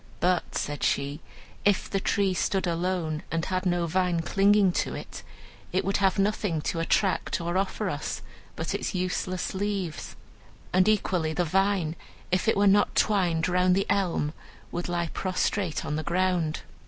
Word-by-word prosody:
"But," 180 -1 +1
said 145 0 -2
she, 140 +2 0 0.4
"if 205 -2 +2
the 195 - -1
tree 195 0 +1
stood 190 +1 0
alone, 170 -2 -1
and 165 0 -1
had 185 0 -1
no 175 -1 +1
vine 175 0 +1
clinging 200 +2 +4
to - - -4
it, - - -8 0.5
it 190 +1 0
would 195 +1 +1
have 195 -2 +2
nothing 200 -4 +1
to 165 - -2
attract 190 +4 +1
or 170 +1 -2
offer 195 +1 0
us - - -3 0.3
but - - -3
its - - -2
useless 185 0 -2
leaves. 195 -5 -3 0.6
And 185 +2 +4
equally 180 -6 +1
the 175 +2 0
vine, 190 -2 +1 0.4
if 185 +3 +1
it 220 - +3
were 200 - +4
not 205 +1 +4
twined 180 -6 +2
round 180 0 +3
the 195 - +1
elm, 175 -6 0 0.4
would 175 +1 -3
lie 170 -1 -1
prostrate 185 -2 -1
on 150 - -2
the 155 - -2
ground. 180 -3 +1
185 Hz, 165 wpm, -27 LUFS, 170-195 Hz, 0.6 s, clinging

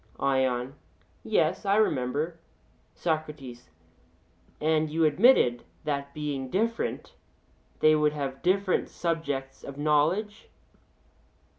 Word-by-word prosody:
ION: 130 -1 +1 0.5
Yes, - - +1
I 200 0 +2
remember. 155 -3 0 0.6
SOCRATES: 150 -7 -4 0.9
And 155 0 +1
you 160 +1 +2
admitted 150 - +4 0.2
that 140 -2 -3
being 145 -3 -3
different 230 - -2 0.7
they 155 - +6
would 150 -1 +2
have 135 -2 -4
different 190 +1 +1
subjects 145 -6 -3
of 140 - -8
knowledge? 160 +9 +1
150 Hz, 95 wpm, -27 LUFS, 135-170 Hz, 0.9 s, they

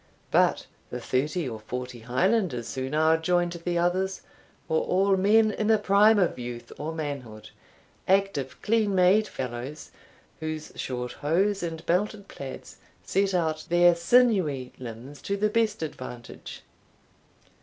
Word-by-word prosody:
But - - +3 0.2
the 125 - -5
thirty 145 +6 -1
or 110 -3 -5
forty 125 +2 -6
Highlanders 125 - 0
who 130 0 -3
now 160 +2 +3
joined 175 +1 +1
the 175 0 -3
others, 185 +2 0 0.5
were 160 - +1
all 195 +1 +2
men 215 +3 +4
in 210 0 -2
the 220 0 +5
prime 210 +1 +5
of 180 -9 +1
youth 120 -1 -7
or 155 +2 -3
manhood, 140 -9 -6 0.6
active 190 -9 +1
clean 215 -2 +2
made 190 +4 +4
fellows, 130 +4 -6 0.5
whose 155 -1 -5
short 125 -1 -4
hose 190 +7 0
and 165 -2 -5
belted 200 +3 0
plaids 135 -1 -9 0.3
set 195 0 +1
out 160 -2 -1
their 175 0 +6
sinewy 170 - +2
limbs 125 +4 -9
to 200 - -2
the 210 +1 +2
best 220 -5 +1
advantage. 125 -6 -8
170 Hz, 135 wpm, -27 LUFS, 130-195 Hz, 0.6 s, their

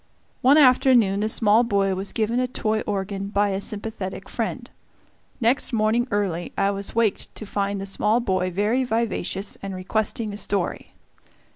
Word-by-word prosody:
One 270 +4 +6
afternoon 250 -7 +5
the 215 +1 0
small 220 +1 +4
boy 200 -4 +1
was 190 +1 -3
given 230 +2 0
a 255 - +1
toy 220 -3 -1
organ 200 -1 -3
by 205 0 +1
a 195 0 -2
sympathetic 205 -2 -4
friend. - - -3 0.7
Next 245 +3 +2
morning 225 +2 +1
early 190 -4 -2
I 200 0 +2
was 200 +1 -4
waked 230 -3 0
to 215 - -6
find 200 0 -2
the 195 - -4
small 210 +3 +1
boy 185 -5 0
very 210 +8 +1
vivacious 220 -4 -2
and 195 -1 -5
requesting 215 +3 -2
a - - -6
story. 195 -2 -2
205 Hz, 160 wpm, -23 LUFS, 195-230 Hz, 0.7 s, One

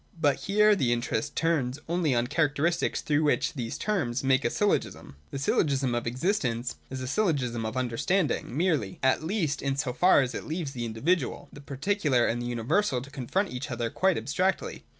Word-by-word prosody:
But 145 -4 +3
here 210 +1 +5
the 130 -11 +1
interest 120 +3 -1
turns 145 -6 0
only 165 -5 +1
on 120 - +2
the 120 - -6
characteristics 165 +2 +1
through 150 0 +1
which 150 - +1
these 120 -6 -4
terms 140 - -1
make 135 +1 +3
a - - +2
syllogism. 205 - -1
The - - -5
syllogism 135 -2 +1
of 120 0 -2
existence 125 - -1
is 130 0 -5
a 130 - -4
syllogism 130 - 0
of 110 - -5
understanding 130 +4 0
merely, 155 - 0
at 130 +2 +3
least 160 -5 -1
in 135 -1 -1
so 135 -2 -2
far 175 +3 +5
as 130 -1 -2
it - - -5
leaves 160 -3 -3
the 120 -3 -4
individual, 135 +11 -1
the 145 - -11
particular, 140 - +1
and 120 +1 -1
the 120 - -3
universal 125 - 0
to 135 +3 -11
confront 145 - -1
each 125 +3 -5
other 120 -2 -2
quite 190 -1 +2
abstractly. 180 +11 -1
140 Hz, 190 wpm, -28 LUFS, 120-170 Hz, -, here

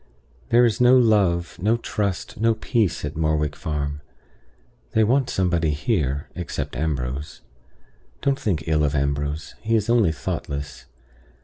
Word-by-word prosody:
"There 120 +1 +6
is 115 +1 0
no 125 +1 +7
love, 95 -8 +2
no 110 +4 +2
trust, 105 -6 -3
no 115 0 +3
peace, 110 - 0
at 75 - -5
Morwick 75 -2 0
Farm. 75 -3 -3 0.9
They 110 - +4
want 125 +4 +2
somebody 85 -4 +1
here, 75 - -1
except 90 -6 -4
Ambrose. 70 -1 -3 0.8
Don't 140 0 +1
think 85 -7 -1
ill 75 -1 +2
of 75 0 0
Ambrose; 70 +2 -2
he 115 +1 +1
is 110 +1 +1
only 115 -8 +4
thoughtless. 70 -2 -5
85 Hz, 135 wpm, -23 LUFS, 75-110 Hz, 0.9 s, no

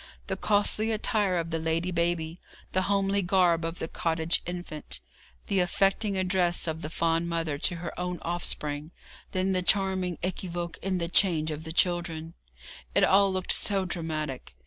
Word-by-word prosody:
The - - -2
costly 215 +1 +2
attire 210 -4 +1
of 165 0 -2
the 165 - 0
lady 165 +3 0
baby, 170 -1 0 0.3
the 185 - +2
homely 200 0 +2
garb 175 -3 +3
of 165 +1 -3
the 160 - -3
cottage 165 0 0
infant, 175 - -5 0.5
the 195 - +1
affecting 195 +2 +2
address 180 -2 +2
of 160 -1 -3
the 155 - -4
fond 165 +1 +1
mother 165 -4 -1
to 175 - +1
her 170 +1 -6
own 180 0 -2
offspring, 150 -3 -1 0.4
then 185 +1 +1
the 185 -1 +1
charming 185 -2 +1
équivoque 175 -2 -3
in 190 -1 -1
the 170 -1 -1
change 165 -3 +3
of 155 +1 -5
the 160 - -5
children 170 -2 0 0.6
it - - +5
all 195 0 +5
looked 185 -1 -1
so 195 -2 +1
dramatic. 155 - -4
175 Hz, 165 wpm, -28 LUFS, 165-190 Hz, 0.6 s, it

